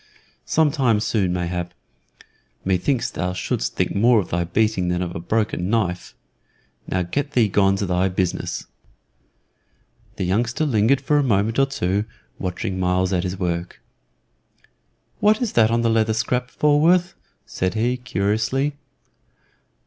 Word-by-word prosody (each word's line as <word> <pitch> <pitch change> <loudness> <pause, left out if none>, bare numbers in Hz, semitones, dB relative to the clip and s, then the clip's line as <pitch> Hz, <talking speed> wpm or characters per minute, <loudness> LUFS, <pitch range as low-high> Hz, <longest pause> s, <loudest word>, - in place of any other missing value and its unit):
"Some 155 -2 +3
time 125 -7 +2
soon, 105 -4 0
mayhap. 90 0 -3 0.9
Me 95 -1 +2
thinks 130 +7 -1
thou 90 +1 -2
shouldst 90 -8 -2
think - - 0
more 115 +3 +4
of 95 - -4
thy 85 0 0
beating 100 0 0
than 90 +1 0
of 85 -1 -5
a - - -3
broken 95 -1 -1
knife. 95 -6 -1 0.7
Now 90 0 0
get 140 +11 -3
thee 120 -5 +4
gone 100 -1 +3
to 100 - -2
thy 90 +1 +1
business." 90 -1 -2 1.5
The - - -3
youngster 120 - 0
lingered 125 +1 +2
for 145 +2 +2
a - - +2
moment 110 -1 +1
or 135 - +4
two 100 -5 -1 0.3
watching 95 +1 -3
Myles 90 +1 +1
at 90 - +1
his 90 +1 -4
work. 85 -1 -3 1.4
"What 215 +1 +4
is 245 -4 -1
that 110 -2 +4
on 115 0 +1
the - - +2
leather 110 -1 +2
scrap, 125 +2 -1
Falworth?" 170 +5 +3 0.3
said 95 +3 -2
he, 120 +3 +1
curiously. 110 +5 -1
105 Hz, 150 wpm, -22 LUFS, 90-125 Hz, 1.5 s, more